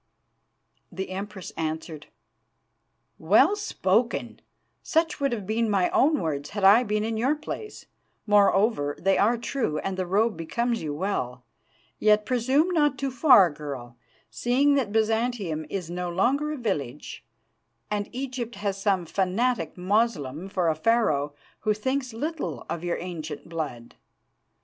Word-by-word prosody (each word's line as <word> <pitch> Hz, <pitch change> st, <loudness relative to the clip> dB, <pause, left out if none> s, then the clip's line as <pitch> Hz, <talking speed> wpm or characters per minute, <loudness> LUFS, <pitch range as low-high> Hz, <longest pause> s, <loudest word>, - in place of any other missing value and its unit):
"The 190 Hz, 0 st, -5 dB
Empress 195 Hz, 0 st, -6 dB
answered: 160 Hz, -1 st, -4 dB, 1.1 s
'Well 220 Hz, -, +4 dB
spoken! 235 Hz, -, -1 dB, 0.4 s
Such 325 Hz, -1 st, 0 dB
would 275 Hz, -2 st, +1 dB
have 215 Hz, -5 st, -3 dB
been 220 Hz, +2 st, 0 dB
my 190 Hz, -3 st, +2 dB
own 300 Hz, +1 st, +3 dB
words 145 Hz, -3 st, -3 dB
had 205 Hz, -1 st, -5 dB
I 200 Hz, +5 st, +8 dB
been 210 Hz, -3 st, -1 dB
in 225 Hz, 0 st, -2 dB
your 260 Hz, +7 st, +2 dB
place. 420 Hz, +7 st, -7 dB, 0.4 s
Moreover, 200 Hz, -7 st, +3 dB
they 195 Hz, +1 st, +2 dB
are 230 Hz, +4 st, +3 dB
true, 235 Hz, -, -2 dB
and 190 Hz, +4 st, -3 dB
the 185 Hz, -1 st, -2 dB
robe 210 Hz, +4 st, +2 dB
becomes 235 Hz, +8 st, -2 dB
you 155 Hz, -, -3 dB
well. 145 Hz, -7 st, -3 dB, 0.6 s
Yet 210 Hz, 0 st, +4 dB
presume 260 Hz, +8 st, +2 dB
not 295 Hz, -5 st, +2 dB
too 275 Hz, -1 st, -2 dB
far, 245 Hz, -, +6 dB
girl, 140 Hz, -5 st, -7 dB, 0.4 s
seeing 270 Hz, +4 st, +2 dB
that 265 Hz, -7 st, 0 dB
Byzantium 220 Hz, -7 st, 0 dB
is 180 Hz, -4 st, -4 dB
no 180 Hz, 0 st, -3 dB
longer 270 Hz, -, +1 dB
a 305 Hz, -, -4 dB
village, 150 Hz, -, -4 dB, 0.7 s
and 205 Hz, -1 st, -2 dB
Egypt 250 Hz, -2 st, -5 dB
has 200 Hz, -1 st, -3 dB
some 195 Hz, -4 st, +1 dB
fanatic 200 Hz, +9 st, 0 dB
Moslem 185 Hz, -, 0 dB
for 185 Hz, -3 st, 0 dB
a 160 Hz, -, +3 dB
Pharaoh, 155 Hz, -6 st, +1 dB, 0.2 s
who 215 Hz, -1 st, +1 dB
thinks 260 Hz, +3 st, -2 dB
little 300 Hz, +7 st, -4 dB
of 170 Hz, -, -4 dB
your 175 Hz, -1 st, -1 dB
ancient 160 Hz, -4 st, -6 dB
blood. 150 Hz, -8 st, -5 dB
205 Hz, 140 wpm, -26 LUFS, 170-245 Hz, 1.1 s, I